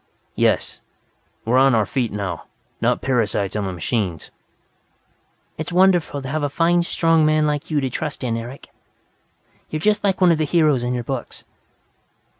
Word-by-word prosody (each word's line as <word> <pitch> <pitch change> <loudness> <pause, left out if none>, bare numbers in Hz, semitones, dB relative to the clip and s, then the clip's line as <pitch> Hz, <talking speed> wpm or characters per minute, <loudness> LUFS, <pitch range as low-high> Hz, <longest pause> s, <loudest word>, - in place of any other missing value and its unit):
"Yes, - - 0 0.6
we're 125 +3 +3
on 135 -2 +5
our 110 -2 +2
feet 125 -2 -2
now, 100 -5 -4 0.4
not - - +1
parasites 110 -7 0
on 105 -2 -1
the - - -3
machines." 90 -1 -3 1.3
"It's 160 - -4
wonderful 175 -6 +2
to - - -5
have 155 +3 -2
a 145 - 0
fine, 170 +4 +2
strong 165 -2 +2
man 155 0 +3
like 150 -1 -2
you 155 -2 +1
to 135 - -1
trust 150 +1 -4
in, 120 -2 -1
Eric. 120 +4 -8 1.0
You're 155 - -3
just 210 +4 +1
like 195 -2 +1
one 180 -2 +5
of 160 - +1
the - - +2
heroes 155 -4 +2
in 125 +1 -1
your 120 - -3
books!" 130 0 -6
140 Hz, 170 wpm, -21 LUFS, 115-160 Hz, 1.3 s, on